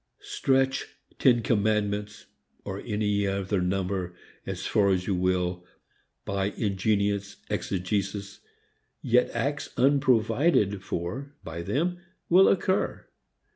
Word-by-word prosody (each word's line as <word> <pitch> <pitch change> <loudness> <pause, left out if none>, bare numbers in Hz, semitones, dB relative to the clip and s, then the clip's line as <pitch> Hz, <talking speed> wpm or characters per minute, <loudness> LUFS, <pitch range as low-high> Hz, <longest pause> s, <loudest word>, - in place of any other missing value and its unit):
Stretch 135 0 +1 0.3
ten 120 -3 +4
commandments 105 -1 0 0.4
or 100 0 -4
any 105 -2 0
other 95 0 -1
number 90 -1 -2 0.3
as - - -4
far 100 -2 +3
as 90 -1 +1
you 100 - 0
will 90 -1 0 0.6
by 100 -1 -1
ingenious 100 -1 0 0.2
exegesis, 100 +1 -2 0.6
yet 125 +1 +3
acts 140 +5 -2
unprovided 125 - +3
for 120 +12 -4
by 80 +1 -6
them 170 - -1 0.3
will 185 +3 +7
occur. 190 0 0
100 Hz, 100 wpm, -27 LUFS, 95-125 Hz, 0.6 s, will